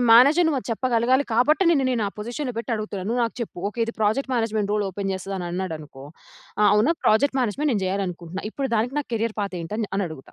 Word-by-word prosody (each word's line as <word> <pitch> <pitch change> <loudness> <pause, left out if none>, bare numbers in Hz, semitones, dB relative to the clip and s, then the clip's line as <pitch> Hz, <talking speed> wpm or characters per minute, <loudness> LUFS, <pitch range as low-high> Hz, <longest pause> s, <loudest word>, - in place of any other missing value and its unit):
Manager 280 +9 +7
నువ్వు 305 -4 +1
అది - - -11
చెప్పగలగాలి. 255 +3 +2
కాబట్టి, 290 +10 +3
నిన్ను 285 -5 +3
నేను 240 -3 0
ఆ - - 0
పొజిషన్‌లో 245 +5 -4
పెట్టి 235 - -5
అడుగుతున్నా. 210 -3 -4
నువ్వు 240 +2 0
నాకు 230 - -4
చెప్పు. 230 - -5
ఓకె. 215 - -11
ఇది 230 - -5
ప్రాజెక్ట్ 220 +6 +1
మేనేజ్మెంట్ 220 -3 0
రోల్ 210 -1 +1
ఓపెన్ 195 +1 -3
చేస్తాదన్నాడనుకో, 175 -6 -5 0.6
ఆ! - - +4
అవునా 220 +10 +4
ప్రాజెక్ట్ 265 +6 +3
మేనేజ్మెంట్ 265 +6 0
నేను 205 -4 0
చేయాలనుకుంటున్నా. 185 -2 -3
ఇప్పుడు 270 +3 -3
దానికి 235 +5 0
నా 295 - -1
కేరియర్ 225 0 -1
పాత్ 200 -2 -3
ఏంటని, 210 +7 -3
అని 200 0 +1
అడుగుతా. 155 -4 -11
220 Hz, 205 wpm, -24 LUFS, 195-250 Hz, 0.6 s, Manager